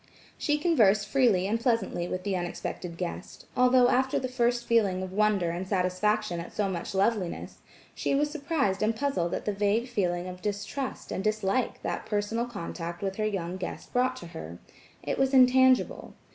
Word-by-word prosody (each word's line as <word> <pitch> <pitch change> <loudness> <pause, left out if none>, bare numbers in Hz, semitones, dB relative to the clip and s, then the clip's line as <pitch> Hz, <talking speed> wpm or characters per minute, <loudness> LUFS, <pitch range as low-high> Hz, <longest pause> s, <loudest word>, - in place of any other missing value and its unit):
She 295 0 0
conversed 220 - +3
freely 235 -9 +3
and 220 +4 0
pleasantly 225 -7 0
with 185 0 -4
the 195 -1 -1
unexpected 175 -1 -4
guest, 175 -1 -6
although 250 0 +5
after 260 +1 +2
the 255 - -1
first 240 -1 0
feeling 200 -6 +2
of 185 0 -6
wonder 205 -4 +2
and 180 +2 -4
satisfaction 190 0 0
at 170 - -7
so 205 - +1
much 185 0 -4
loveliness, 195 -2 -1 0.3
she - - -1
was 295 +1 +1
surprised 285 - -1
and 220 +1 +2
puzzled 220 -10 -1
at - - -5
the 210 - 0
vague 205 +4 +1
feeling 180 -7 -1
of 180 0 -8
distrust 210 +7 -4
and 190 - -2
dislike 215 +3 0
that - - -3
personal 220 +3 -1
contact 175 -4 -6
with 195 -1 -2
her 215 -1 +1
young 185 -3 -3
guest 185 - -7
brought 250 +1 +2
to - - -9
her. 80 - -8 0.5
It - - -2
was 270 0 +2
intangible. 260 0 +4
210 Hz, 175 wpm, -28 LUFS, 185-250 Hz, 0.5 s, although